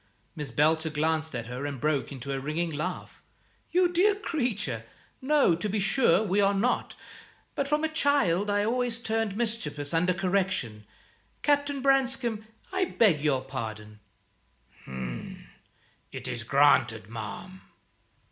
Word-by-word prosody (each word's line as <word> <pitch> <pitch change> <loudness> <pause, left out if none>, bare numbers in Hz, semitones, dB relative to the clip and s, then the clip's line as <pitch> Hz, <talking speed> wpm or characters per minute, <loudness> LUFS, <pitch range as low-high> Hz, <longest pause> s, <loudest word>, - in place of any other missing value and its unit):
Miss 150 -4 -4
Belcher 160 +6 +2
glanced 160 0 -1
at 120 -1 -4
her 125 +3 -6
and 140 -2 -5
broke 150 0 0
into 135 0 -5
a 135 - -2
ringing 155 +5 -2
laugh. 155 +5 -5 0.5
"You 360 +1 +4
dear 395 +4 +4
creature! 230 - -2 0.4
No, 280 - +4
to 180 +6 -2
be 210 +2 0
sure, 195 -1 +4
we 205 0 +1
are 200 0 +3
not; 235 +6 0 0.6
but 280 - -1
from 300 +2 +1
a - - +3
child 280 - +2
I 205 0 +2
always 245 0 0
turned 225 -3 -2
mischievous 170 -11 -2
under 180 +2 +2
correction. 180 - -1 0.6
Captain 285 -2 +1
Branscome, 260 -5 +1 0.3
I 380 0 +2
beg 200 - +3
your 140 -4 +1
pardon." 110 -5 -6 2.1
"It - - -6
is 115 - -3
granted, 115 -7 +3
ma'am." 115 - -7
185 Hz, 135 wpm, -28 LUFS, 145-240 Hz, 2.1 s, You